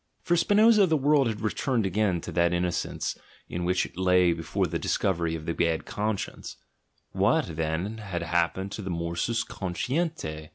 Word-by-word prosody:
For 175 -1 +2
Spinoza 210 +3 +5
the 160 -2 +2
world 145 -1 +3
had 110 -2 -3
returned 115 +1 0
again 95 -2 +1
to 90 - -6
that 85 +1 +2
innocence 90 0 -1 0.3
in 85 0 -3
which 90 +1 +1
it - - -12
lay 90 -2 +4
be 85 - -6
fore 80 - -1
the - - -3
discovery 85 -4 0
of 80 -1 -7
the 85 - -1
bad 80 -1 0
conscience: 105 -1 -4 0.5
what, 80 - +1
then, 80 +7 -2
had 95 -5 -4
happened 85 +3 0
to 105 - -5
the 95 - -5
morsus 85 +7 -1
consdentia? 95 - -3
90 Hz, 170 wpm, -27 LUFS, 85-115 Hz, 0.5 s, Spinoza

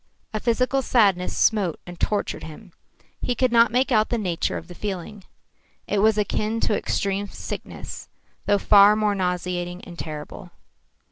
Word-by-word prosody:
A 215 - -1
physical 255 +4 +1
sadness 200 -8 +2
smote 200 -7 +2
and 175 -1 -10
tortured 210 -1 -1
him. 170 +4 -11 0.5
He 245 - -1
could 255 -1 +1
not 230 0 +5
make 255 +3 +1
out 215 -2 +3
the 240 - 0
nature 180 -6 -1
of - - -9
the 180 - -10
feeling. 195 +1 -6 0.6
It 205 - 0
was 215 +1 +4
akin 215 +2 -1
to 210 - +2
extreme 200 0 -1
sickness, - - -8 0.4
though 205 - +4
far 205 +1 +6
more 215 -1 +1
nauseating 180 -1 -2
and 175 -1 -11
terrible. 150 -2 -7
205 Hz, 155 wpm, -24 LUFS, 180-220 Hz, 0.6 s, far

